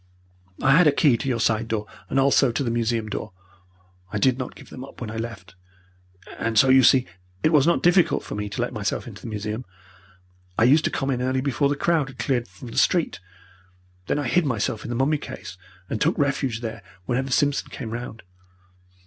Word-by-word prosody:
I 135 - +5
had 165 +4 +6
a - - +6
key 140 -2 +4
to 135 +3 -3
your 120 -3 0
side 115 0 +1
door 110 -2 -2 0.2
and - - +1
also 135 -1 +4
to 120 - -1
the 120 - -1
museum 115 -1 0
door. 110 0 -5 0.8
I 105 - -2
did 130 +4 +2
not 130 - -5
give - - -14
them 130 - -8
up 135 - -12
when 115 -3 -5
I - - -7
left. 115 -3 -6 0.9
And 115 -1 -1
so 135 - +6
you 130 0 +7
see 130 +1 +5 0.4
it 155 - +3
was 150 0 +5
not 170 - +2
difficult 175 0 +4
for - - -7
me 105 0 -3
to 100 - -3
let - - -4
myself - - -2
into - - -10
the - - -8
museum. 105 +2 -4 0.9
I - - +3
used 145 +6 +5
to - - +2
come 135 0 -2
in 125 -1 -1
early 130 +1 0
before 140 +1 +1
the 145 - 0
crowd 155 -2 +1
had 130 - -13
cleared 120 0 -1
from 100 +7 -11
the - - 0
street. 170 - +2 0.9
Then - - 0
I 145 -3 -1
hid 180 +8 +3
myself 115 -5 -1
in - - -7
the 120 - -2
mummy 140 +4 +1
case, 90 - -8 0.3
and 110 - -4
took 165 +4 +2
refuge 140 -5 0
there 110 -3 -5 0.2
whenever 135 +6 -1
Simpson 145 +2 +1
came 115 -5 -7
round. 120 -1 -6
125 Hz, 215 wpm, -24 LUFS, 115-140 Hz, 0.9 s, you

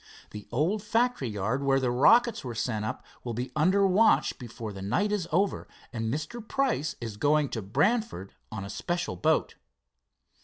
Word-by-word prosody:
The 105 -1 -9
old 165 - +1
factory 230 - +1
yard 105 +6 -1
where 135 -1 +3
the 125 -2 0
rockets 235 - +4
were 120 -3 -5
sent 110 -2 -2
up - - -5 0.2
will 120 -2 -4
be 125 +3 -4
under 185 +6 +3
watch 200 +4 +3
before 115 -3 -7
the 95 - -8
night 205 - 0
is 200 -5 -1
over, 195 +5 0 0.3
and 115 -1 -2
Mr. 155 - -4
Price 215 - -1
is 115 -3 -6
going 145 +3 +2
to 115 - -4
Brantford 150 - 0 0.2
on 100 -2 -5
a - - -7
special 175 +7 -2
boat." 160 0 +1
145 Hz, 170 wpm, -28 LUFS, -, 0.3 s, rockets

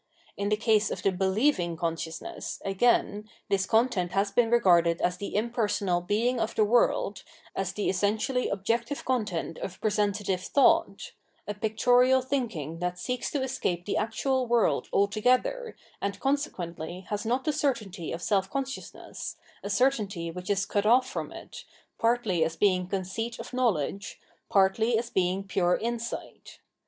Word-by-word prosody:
In 200 0 -2
the 210 - +2
case 215 -2 +2
of - - -5
the 195 - +3
"believing" 190 - +1
conscious 165 -1 -3
ness, - - -6
again, 210 +1 +1 0.2
this 195 -1 +1
content 220 -6 +1
has 200 +1 +1
been 235 +1 +3
regarded 175 -8 +4
as 180 0 0
the 200 - -6
im 225 +3 0
personal 205 -6 0
Being 225 +7 0
of 220 0 -2
the 215 - +4
World, 210 -2 +2 0.3
as 195 -1 -1
the 210 - -2
essentially 215 +7 0
objective 230 +8 -2
content 210 -10 -2
of 185 - -6
presentative 205 -3 0
thought 275 +9 +2 0.2
— - - -40
a 205 - -2
pictorial 245 +5 +3
thinking 220 - -3
that 180 0 -2
seeks 250 +7 -3
to 280 -3 -1
escape 175 -9 -2
the - - -1
actual 255 +4 0
world 235 -1 +2
altogether, 255 - +1 0.3
and 200 0 -2
consequently 180 - -2
has 210 -1 -2
not 245 +4 0
the 305 - 0
certainty 215 - -2
of 170 +1 -5
self 195 -2 +1
consciousness, 270 -1 -5 0.2
a - - -5
certainty 205 -10 +1
which 180 +2 -8
is 200 -1 +1
cut 205 +1 0
off 255 +3 +5
from - - -5
it, - - -10 0.4
partly 230 -7 +2
as 165 +1 -2
being 185 -1 +2
conceit 195 +5 -3
of - - -9
knowledge, 205 - -1 0.3
partly 215 +4 +3
as 235 +1 -3
being 185 +1 +1
pure 180 -2 +1
insight. 235 0 -5
210 Hz, 155 wpm, -28 LUFS, 185-240 Hz, 0.4 s, off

